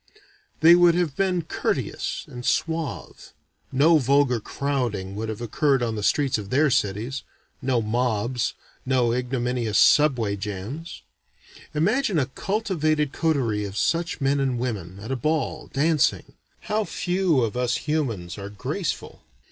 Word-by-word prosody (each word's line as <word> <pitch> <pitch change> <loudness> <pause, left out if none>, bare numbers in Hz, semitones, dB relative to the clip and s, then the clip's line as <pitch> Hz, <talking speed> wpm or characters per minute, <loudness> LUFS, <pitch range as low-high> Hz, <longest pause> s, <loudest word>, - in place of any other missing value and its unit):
They 165 +2 +9
would 175 -1 +6
have 170 -6 0
been 185 -3 +1
courteous - - -2
and 125 0 -8
suave. 160 +2 -2 0.4
No 155 +4 +5
vulgar 135 -2 +3
crowding 120 -7 -2
would 110 +1 -4
have 110 +1 -5
occurred 135 +3 +1
on 115 -1 -1
the 105 - -3
streets 130 +5 +1
of 100 -2 -8
their 145 +4 +3
cities. 115 +3 -1 0.4
No 125 -3 +1
mobs. 120 +1 -1 0.3
No 125 -3 +2
ignominious 125 -3 -1
subway 125 -9 +4
jams. 105 - -6 0.7
Imagine 200 - +1
a 140 - +2
cultivated 155 - -1
coterie 130 -10 0
of 100 0 -6
such 170 +6 0
men 140 0 +1
and 135 -3 0
women, 100 -7 -4
at 110 +5 -7
a - - +1
ball, 150 +2 -1
dancing. 150 0 +1 0.3
How 215 0 -1
few 180 - +1
of 115 -1 -2
us 125 0 0
humans 115 - -2
are 100 0 -6
graceful. 140 - -4
130 Hz, 140 wpm, -24 LUFS, 115-155 Hz, 0.7 s, They